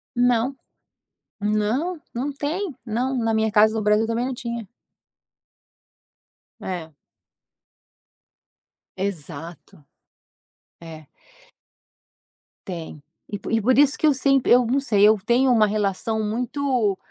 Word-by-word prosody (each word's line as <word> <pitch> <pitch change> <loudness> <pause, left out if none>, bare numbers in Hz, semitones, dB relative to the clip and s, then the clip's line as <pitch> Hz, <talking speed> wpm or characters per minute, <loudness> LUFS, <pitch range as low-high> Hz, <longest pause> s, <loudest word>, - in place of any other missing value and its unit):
Não, 245 +2 +2 0.9
não, 215 - 0 0.2
não 260 +5 -2
tem, 310 +4 -3
não, 250 +4 -1
na 225 -2 0
minha 220 0 +1
casa 215 +1 +4
no 220 - -1
Brasil 210 +2 +3
também 230 +2 -1
não 260 - -3
tinha. 235 -4 -6 1.9
É. 165 -4 -6 2.0
Exato. 165 -5 -6 1.0
É. 160 -3 -11 1.6
Tem, 165 -5 -7 0.3
e 205 - -4 0.2
e 225 -1 +2
por 255 +4 +2
isso 285 0 +4
que 310 - +2
eu 295 - +5
sempre 270 0 +2
eu 245 0 +5
não 255 +5 +1
sei 210 -7 +2
eu 215 0 +6
tenho 255 +2 +3
uma 220 -3 +4
relação 215 +1 -1
muito, 240 -2 -1
225 Hz, 110 wpm, -23 LUFS, 205-260 Hz, 2.0 s, eu